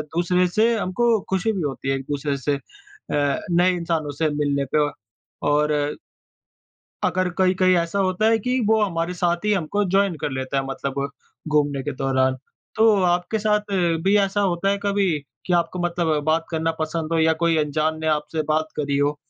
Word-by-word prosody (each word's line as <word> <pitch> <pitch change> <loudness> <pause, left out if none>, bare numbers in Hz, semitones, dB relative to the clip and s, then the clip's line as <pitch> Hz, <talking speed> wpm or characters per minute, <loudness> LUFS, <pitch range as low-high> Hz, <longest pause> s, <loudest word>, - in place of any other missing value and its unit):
दूसरे 180 +1 +2
से 220 +6 +2
हमको 220 +4 +1
खुशी 190 +4 +1
भी 195 -4 -3
होती 135 -2 -3
है, 135 - +2
एक-दूसरे 140 +1 -3
से 140 +2 -1
अ, - - -6 0.9
नए 180 +2 +4
इंसानों 165 -4 -2
से 155 - +3
मिलने 145 -1 0
पे, 150 +1 +2
व 145 - -3 0.6
और 150 +1 +2 1.3
अगर 185 0 +1
कहीं-कहीं 185 0 +3
ऐसा 170 +4 -1
होता 185 +2 +1
है 225 - +4
कि 250 +4 0
वो 220 0 +3
हमारे 170 -2 -2
साथ 175 +1 -1
ही 210 - +2
हमको 200 +3 0
जॉइन 195 -3 +3
कर - - -1
लेता 130 +1 -3
है, 135 - +1
मतलब 140 +1 -3 0.4
घूमने 145 -3 +1
के 145 - -3
दौरान। 130 -1 +1 0.4
तो 220 -1 +5
आपके 180 +5 +1
साथ 210 -1 0 0.3
भी 195 +2 +3
ऐसा 200 0 +1
होता 190 0 +1
है 200 - +1
कभी 200 -2 +1 0.4
कि 180 - 0
आपको 170 +1 0
मतलब 170 -3 0
बात 160 +1 +1
करना 165 0 0
पसंद 155 +1 -2
हो, 165 - +2
या 160 0 +4
कोई 165 -1 +3
अंजान 155 +1 0
ने 160 - -2
आपसे 155 +1 -4
बात 155 0 0
करी 140 -1 0
हो? 145 +1 +1
170 Hz, 185 wpm, -22 LUFS, 150-190 Hz, 1.3 s, तो